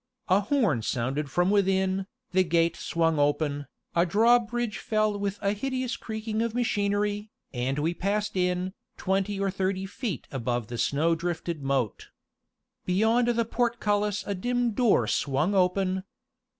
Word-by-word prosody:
A 185 Hz, +2 st, +5 dB
horn 210 Hz, -, +1 dB
sounded 135 Hz, +6 st, -2 dB
from 175 Hz, +6 st, +2 dB
within, 190 Hz, -1 st, +2 dB, 0.2 s
the 185 Hz, 0 st, +4 dB
gate 170 Hz, -1 st, +2 dB
swung 165 Hz, -2 st, 0 dB
open, 145 Hz, -1 st, 0 dB, 0.3 s
a 170 Hz, -, +5 dB
drawbridge 230 Hz, +3 st, +2 dB
fell 215 Hz, -1 st, 0 dB
with 200 Hz, 0 st, -2 dB
a 200 Hz, 0 st, +2 dB
hideous 255 Hz, +3 st, -2 dB
creaking 220 Hz, 0 st, -3 dB
of 230 Hz, 0 st, -1 dB
machinery, 205 Hz, -2 st, 0 dB, 0.2 s
and 130 Hz, +2 st, -1 dB
we 160 Hz, +3 st, 0 dB
passed 205 Hz, +4 st, -1 dB
in, 180 Hz, 0 st, 0 dB, 0.2 s
twenty 195 Hz, +1 st, 0 dB
or 195 Hz, -1 st, 0 dB
thirty 190 Hz, 0 st, -1 dB
feet 200 Hz, -, -4 dB
above 120 Hz, -3 st, -2 dB
the 120 Hz, -1 st, -5 dB
snow 160 Hz, +4 st, +2 dB
drifted 170 Hz, -1 st, -3 dB
moat. 135 Hz, -6 st, -1 dB, 0.7 s
Beyond 220 Hz, +6 st, +2 dB
the 235 Hz, -1 st, +2 dB
portcullis 210 Hz, -3 st, 0 dB
a 200 Hz, -, -2 dB
dim 245 Hz, +5 st, 0 dB
door 225 Hz, 0 st, +3 dB
swung 145 Hz, +7 st, 0 dB
open. 185 Hz, 0 st, +1 dB
195 Hz, 140 wpm, -27 LUFS, 165-215 Hz, 0.7 s, A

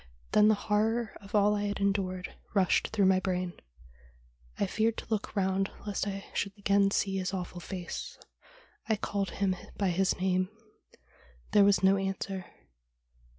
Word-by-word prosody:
Then 210 Hz, -, +6 dB
the 215 Hz, -, +5 dB
horror 220 Hz, +2 st, 0 dB
of 200 Hz, +1 st, -7 dB
all 205 Hz, 0 st, +5 dB
I 205 Hz, 0 st, -1 dB
had 205 Hz, 0 st, -2 dB
endured 195 Hz, -2 st, -1 dB, 0.2 s
rushed 190 Hz, -3 st, +3 dB
through 205 Hz, -3 st, +2 dB
my 190 Hz, 0 st, +5 dB
brain. 180 Hz, -1 st, -2 dB, 1.0 s
I -, -, +1 dB
feared 220 Hz, +3 st, 0 dB
to -, -, -5 dB
look 215 Hz, -1 st, -2 dB
round 195 Hz, 0 st, +1 dB, 0.2 s
lest 205 Hz, -1 st, -2 dB
I 195 Hz, 0 st, -4 dB
should 200 Hz, 0 st, -2 dB
again 200 Hz, 0 st, +3 dB
see 195 Hz, -1 st, 0 dB
his 190 Hz, +1 st, -2 dB
awful 180 Hz, -1 st, -5 dB
face. 180 Hz, 0 st, -6 dB, 0.7 s
I 220 Hz, -, +4 dB
called 200 Hz, -1 st, -2 dB
him 195 Hz, -2 st, 0 dB, 0.2 s
by 200 Hz, -2 st, +1 dB
his 190 Hz, +2 st, +1 dB
name. 185 Hz, 0 st, +1 dB, 1.0 s
There 205 Hz, -, +6 dB
was 200 Hz, -2 st, +4 dB
no 190 Hz, +1 st, +5 dB
answer. 195 Hz, -1 st, -3 dB
195 Hz, 155 wpm, -30 LUFS, 185-205 Hz, 1.0 s, Then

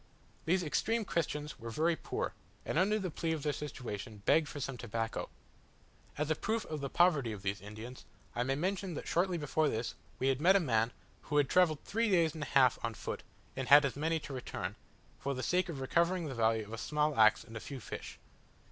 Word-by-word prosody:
These 180 Hz, +2 st, +2 dB
extreme 225 Hz, +8 st, 0 dB
Christians 150 Hz, -4 st, -2 dB
were 115 Hz, -, -6 dB
very 160 Hz, +8 st, +2 dB
poor, -, -, -3 dB, 0.3 s
and, -, -, +1 dB
under 205 Hz, +3 st, +3 dB
the 190 Hz, -5 st, -3 dB
plea 165 Hz, +1 st, -1 dB
of 155 Hz, -3 st, -4 dB
their 150 Hz, -, +1 dB
situation, 115 Hz, -7 st, -6 dB
begged 155 Hz, -1 st, +4 dB
for 145 Hz, -, -6 dB
some 135 Hz, -1 st, -3 dB
tobacco. 115 Hz, -1 st, -3 dB, 0.9 s
As 150 Hz, +1 st, 0 dB
a -, -, +3 dB
proof 220 Hz, +7 st, -1 dB
of 155 Hz, -2 st, -5 dB
the 140 Hz, -, -3 dB
poverty 155 Hz, -9 st, +3 dB
of 100 Hz, -2 st, -7 dB
these 100 Hz, +1 st, -2 dB
Indians, 110 Hz, +5 st, -9 dB, 0.3 s
I 120 Hz, -, 0 dB
may 135 Hz, +2 st, +1 dB
mention 185 Hz, +2 st, -2 dB
that -, -, -6 dB
shortly 180 Hz, +1 st, +1 dB
before 150 Hz, 0 st, +1 dB
this, 115 Hz, 0 st, -2 dB, 0.2 s
we 130 Hz, -, +1 dB
had 135 Hz, +1 st, 0 dB
met 185 Hz, +4 st, +6 dB
a -, -, +6 dB
man, 115 Hz, -8 st, +2 dB, 0.4 s
who 150 Hz, -, +1 dB
had 145 Hz, -2 st, +4 dB
travelled 170 Hz, -5 st, +3 dB
three 230 Hz, +1 st, 0 dB
days 170 Hz, -5 st, +3 dB
and 160 Hz, -, -7 dB
a 145 Hz, -, -3 dB
half 130 Hz, -3 st, +4 dB
on 115 Hz, -1 st, -2 dB
foot, -, -, -5 dB, 0.3 s
and 130 Hz, -1 st, -3 dB
had 145 Hz, 0 st, +9 dB
as 135 Hz, -, -1 dB
many 160 Hz, +3 st, 0 dB
to 145 Hz, -, -7 dB
return, 105 Hz, -6 st, -4 dB, 0.4 s
for 140 Hz, 0 st, -2 dB
the 130 Hz, -, -4 dB
sake 180 Hz, 0 st, +1 dB
of 150 Hz, -5 st, -4 dB
recovering 170 Hz, +6 st, +1 dB
the 140 Hz, -, -4 dB
value 110 Hz, -2 st, +2 dB
of 110 Hz, -, -10 dB
a 115 Hz, -, -4 dB
small 150 Hz, +1 st, 0 dB
axe 110 Hz, 0 st, +6 dB
and 115 Hz, -, -12 dB
a -, -, -3 dB
few 135 Hz, +3 st, -7 dB
fish. -, -, -7 dB
145 Hz, 220 wpm, -33 LUFS, 120-170 Hz, 0.9 s, had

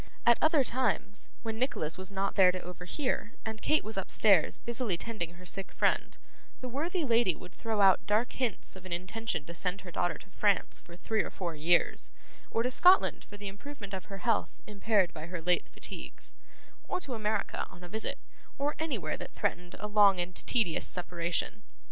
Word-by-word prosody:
At 235 Hz, 0 st, +6 dB
other 310 Hz, -3 st, +5 dB
times, 250 Hz, -5 st, 0 dB
when 225 Hz, -1 st, -3 dB
Nicholas 165 Hz, -, 0 dB
was 185 Hz, +1 st, -2 dB
not 195 Hz, 0 st, -1 dB
there 185 Hz, -2 st, +6 dB
to 185 Hz, -, -4 dB
overhear, 180 Hz, -, -3 dB
and 220 Hz, 0 st, -5 dB
Kate 305 Hz, -, +3 dB
was 220 Hz, 0 st, -5 dB
upstairs 195 Hz, -2 st, +4 dB
busily 235 Hz, -6 st, 0 dB
tending 175 Hz, -5 st, -3 dB
her 180 Hz, +1 st, -13 dB
sick 195 Hz, +2 st, -3 dB
friend, -, -, +1 dB, 0.4 s
the 255 Hz, -, -5 dB
worthy 320 Hz, +7 st, -1 dB
lady 230 Hz, -, +3 dB
would 180 Hz, -, -12 dB
throw 220 Hz, -2 st, -1 dB
out 195 Hz, -1 st, +5 dB
dark 215 Hz, +4 st, +2 dB
hints 245 Hz, -8 st, -1 dB
of 190 Hz, -, -11 dB
an -, -, -11 dB
intention 185 Hz, -2 st, -3 dB
to 170 Hz, -, -8 dB
send 180 Hz, +3 st, -2 dB
her 180 Hz, -, -9 dB
daughter 175 Hz, -1 st, 0 dB
to 200 Hz, -, -16 dB
France 200 Hz, 0 st, +1 dB
for 170 Hz, 0 st, -13 dB
three 220 Hz, +3 st, 0 dB
or -, -, -4 dB
four 175 Hz, -3 st, -4 dB
years, 165 Hz, +3 st, +2 dB, 0.4 s
or 230 Hz, -, +1 dB
to 250 Hz, -, 0 dB
Scotland 365 Hz, +8 st, +5 dB
for 205 Hz, -, -12 dB
the 205 Hz, 0 st, -6 dB
improvement 205 Hz, +1 st, -8 dB
of 190 Hz, -, -4 dB
her 195 Hz, -, -7 dB
health 230 Hz, +1 st, 0 dB
impaired 205 Hz, -3 st, +1 dB
by 160 Hz, -, -7 dB
her 175 Hz, 0 st, -4 dB
late 175 Hz, +2 st, +1 dB
fatigues, -, -, -6 dB, 0.5 s
or -, -, -1 dB
to 280 Hz, -8 st, -5 dB
America 215 Hz, -2 st, -1 dB
on 175 Hz, -, -13 dB
a -, -, -7 dB
visit, 220 Hz, +4 st, -2 dB, 0.4 s
or 285 Hz, +2 st, 0 dB
anywhere 300 Hz, -, -2 dB
that -, -, -8 dB
threatened 175 Hz, 0 st, -2 dB
a 210 Hz, -, -4 dB
long 205 Hz, -3 st, +6 dB
and 175 Hz, +1 st, -3 dB
tedious 210 Hz, -10 st, +2 dB
separation. 175 Hz, +3 st, -2 dB
205 Hz, 190 wpm, -31 LUFS, 180-230 Hz, 0.5 s, At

